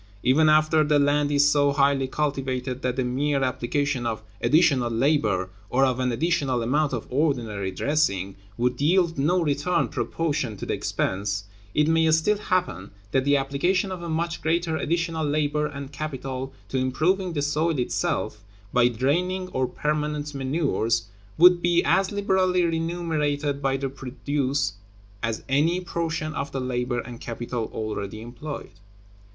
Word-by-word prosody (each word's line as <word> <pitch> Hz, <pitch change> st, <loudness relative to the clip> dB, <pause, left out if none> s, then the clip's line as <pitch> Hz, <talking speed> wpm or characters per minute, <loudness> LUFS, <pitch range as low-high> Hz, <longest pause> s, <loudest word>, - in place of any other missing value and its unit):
Even 150 Hz, +5 st, +4 dB
after 155 Hz, 0 st, +4 dB
the 150 Hz, 0 st, +3 dB
land 145 Hz, 0 st, +2 dB
is 145 Hz, 0 st, +4 dB
so 145 Hz, -1 st, +3 dB
highly 140 Hz, -1 st, +2 dB
cultivated 130 Hz, -3 st, -2 dB
that 125 Hz, -1 st, -1 dB
the 130 Hz, -, 0 dB
mere 135 Hz, +3 st, 0 dB
application 130 Hz, +1 st, -1 dB
of 110 Hz, -1 st, -3 dB, 0.2 s
additional 145 Hz, -7 st, +3 dB
labor, 115 Hz, -7 st, +1 dB, 0.2 s
or 135 Hz, +2 st, +3 dB
of 130 Hz, -1 st, 0 dB
an 125 Hz, -1 st, +1 dB
additional 130 Hz, -2 st, 0 dB
amount 145 Hz, +5 st, +1 dB
of 120 Hz, -4 st, -3 dB
ordinary 120 Hz, -9 st, 0 dB
dressing, 100 Hz, -5 st, 0 dB, 0.2 s
would 125 Hz, +2 st, 0 dB
yield 170 Hz, 0 st, +2 dB
no 170 Hz, +6 st, +2 dB
return 150 Hz, +4 st, +1 dB
proportioned 145 Hz, -9 st, -2 dB
to -, -, -6 dB
the -, -, -1 dB
expense, 100 Hz, +1 st, -2 dB, 0.3 s
it 150 Hz, 0 st, +3 dB
may 160 Hz, 0 st, +3 dB
still 160 Hz, +7 st, +3 dB
happen 175 Hz, -, -1 dB, 0.2 s
that 130 Hz, +2 st, +1 dB
the 145 Hz, 0 st, +4 dB
application 175 Hz, +8 st, 0 dB
of 185 Hz, -2 st, -5 dB
a 170 Hz, -, -5 dB
much 170 Hz, +1 st, -2 dB
greater 165 Hz, 0 st, 0 dB
additional 165 Hz, 0 st, -1 dB
labor 150 Hz, 0 st, 0 dB
and 140 Hz, -2 st, -7 dB
capital 135 Hz, -3 st, -5 dB, 0.2 s
to 130 Hz, -, -1 dB
improving 170 Hz, +8 st, +1 dB
the 145 Hz, -, -1 dB
soil 155 Hz, +2 st, +1 dB
itself, 105 Hz, -4 st, -1 dB, 0.3 s
by 125 Hz, -1 st, +5 dB
draining 175 Hz, +10 st, 0 dB
or 130 Hz, -4 st, 0 dB
permanent 150 Hz, 0 st, -2 dB
manures, 130 Hz, -6 st, 0 dB, 0.3 s
would 175 Hz, +1 st, +7 dB
be 175 Hz, 0 st, +3 dB
as 190 Hz, +2 st, +2 dB
liberally 190 Hz, -3 st, +2 dB
remunerated 160 Hz, -4 st, -1 dB
by 135 Hz, -1 st, +1 dB
the 135 Hz, 0 st, -2 dB
produce 135 Hz, 0 st, -2 dB, 0.5 s
as 115 Hz, -1 st, -2 dB
any 155 Hz, +6 st, +2 dB
portion 165 Hz, -3 st, -3 dB
of 140 Hz, -1 st, -4 dB
the 135 Hz, -, -3 dB
labor 125 Hz, -1 st, -1 dB
and 120 Hz, -1 st, -10 dB
capital 120 Hz, -1 st, -4 dB
already 110 Hz, -1 st, -4 dB
employed. 120 Hz, +6 st, -7 dB
145 Hz, 150 wpm, -25 LUFS, 125-160 Hz, 0.5 s, would